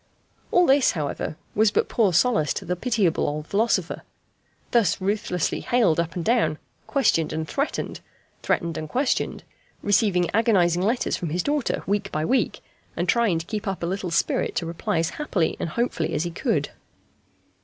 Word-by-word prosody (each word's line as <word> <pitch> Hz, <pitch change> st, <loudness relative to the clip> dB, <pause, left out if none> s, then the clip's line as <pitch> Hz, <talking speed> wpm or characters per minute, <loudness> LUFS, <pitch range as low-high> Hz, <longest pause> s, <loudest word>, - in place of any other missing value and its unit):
All 360 Hz, 0 st, +4 dB
this, 275 Hz, -2 st, +4 dB
however, 150 Hz, -1 st, -3 dB, 0.2 s
was 215 Hz, +1 st, +4 dB
but -, -, +1 dB
poor 215 Hz, -5 st, +2 dB
solace 165 Hz, -, +2 dB
to -, -, -5 dB
the 180 Hz, -, -1 dB
pitiable 205 Hz, -4 st, +1 dB
old 150 Hz, +1 st, -3 dB
philosopher, 220 Hz, +7 st, 0 dB, 0.7 s
thus 225 Hz, -8 st, +3 dB
ruthlessly 195 Hz, -3 st, -1 dB
haled 220 Hz, -10 st, +2 dB
up 170 Hz, -1 st, -2 dB
and 170 Hz, -2 st, -3 dB
down, 230 Hz, -10 st, +2 dB, 0.3 s
questioned 165 Hz, -, +2 dB
and 160 Hz, 0 st, -3 dB
threatened, 280 Hz, +2 st, -2 dB, 0.4 s
threatened 170 Hz, -1 st, -1 dB
and 155 Hz, -1 st, -6 dB
questioned, 260 Hz, -, -1 dB, 0.4 s
receiving 200 Hz, -4 st, +3 dB
agonizing 185 Hz, -6 st, +3 dB
letters 230 Hz, +6 st, 0 dB
from 170 Hz, -, -4 dB
his 175 Hz, +4 st, -1 dB
daughter 290 Hz, -2 st, -1 dB
week 200 Hz, 0 st, -1 dB
by 155 Hz, +1 st, -1 dB
week, 260 Hz, +7 st, 0 dB, 0.4 s
and -, -, -1 dB
trying 230 Hz, -8 st, +3 dB
to 165 Hz, -, -4 dB
keep 210 Hz, +2 st, -4 dB
up 195 Hz, -3 st, -3 dB
a -, -, +1 dB
little 185 Hz, +1 st, -2 dB
spirit 170 Hz, -, 0 dB
to 170 Hz, -, -1 dB
reply 165 Hz, 0 st, -2 dB
as 165 Hz, +3 st, 0 dB
happily 185 Hz, -, 0 dB
and -, -, -2 dB
hopefully 165 Hz, -6 st, -1 dB
as 150 Hz, -, 0 dB
he 175 Hz, -, -3 dB
could. -, -, -1 dB
185 Hz, 170 wpm, -24 LUFS, 165-230 Hz, 0.7 s, All